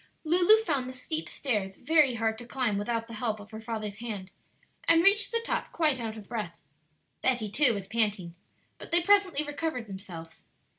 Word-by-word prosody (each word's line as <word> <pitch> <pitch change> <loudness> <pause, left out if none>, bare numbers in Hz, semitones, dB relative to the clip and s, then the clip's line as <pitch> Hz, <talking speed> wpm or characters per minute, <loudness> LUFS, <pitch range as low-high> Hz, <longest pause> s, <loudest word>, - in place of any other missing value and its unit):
Lulu 355 +6 +6
found 275 - -1
the - - -8
steep 310 +5 -3
stairs 205 -8 -2
very 295 -1 +3
hard 225 -1 -1
to 240 - -10
climb 240 -6 -1
without 230 +2 -2
the 230 - -10
help 220 -1 -2
of 205 +2 -13
her 220 0 -8
father's 220 -2 -5
hand, 205 -5 -6 0.6
and 330 0 +5
reached 405 +1 +6
the 465 0 0
top - - -2
quite 300 -6 +2
out 225 -1 -5
of 210 - -11
breath. 210 -8 -5 0.6
Betty 240 -5 0
too 250 0 +3
was 195 -2 -6
panting. 205 -6 0 0.5
But - - -9
they 340 0 +3
presently 385 -6 +3
recovered 290 -4 -3
themselves. 180 -5 -10
235 Hz, 185 wpm, -28 LUFS, 210-305 Hz, 0.6 s, Lulu